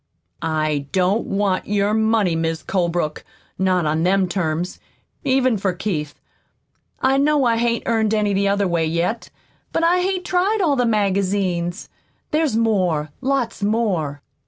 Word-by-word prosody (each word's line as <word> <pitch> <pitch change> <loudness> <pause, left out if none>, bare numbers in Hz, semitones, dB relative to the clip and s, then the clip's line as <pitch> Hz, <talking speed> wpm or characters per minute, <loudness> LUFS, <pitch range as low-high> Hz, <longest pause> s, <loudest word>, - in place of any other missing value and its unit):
"I 155 -3 -1
don't 190 +4 +1
want 195 -1 0
your 205 0 +1
money, 220 -5 +2
Mis' 165 0 -2
Colebrook 170 -4 -1 0.4
not 185 -2 +2
on 155 +1 0
them 190 +2 +2
terms, 175 -1 -2 0.4
even 260 -5 +2
for 190 -1 0
Keith. 155 -6 -4 0.8
I 265 +1 +3
know 290 -1 +3
I 230 -1 +2
hain't 235 0 0
earned 220 -2 +1
any 210 -1 +1
the 200 +1 +1
other 200 0 +1
way, 170 -2 0
yet, 170 +8 -1 0.4
but 330 - 0
I 350 +2 +4
hain't 370 -1 -1
tried 370 +5 +1
all 320 -7 +2
the 245 -2 +1
magazines. 195 -4 0 0.4
There's 305 -5 +1
more 180 -10 +1
lots 260 -5 -1
more." 195 -10 -1
200 Hz, 145 wpm, -21 LUFS, 175-235 Hz, 0.8 s, I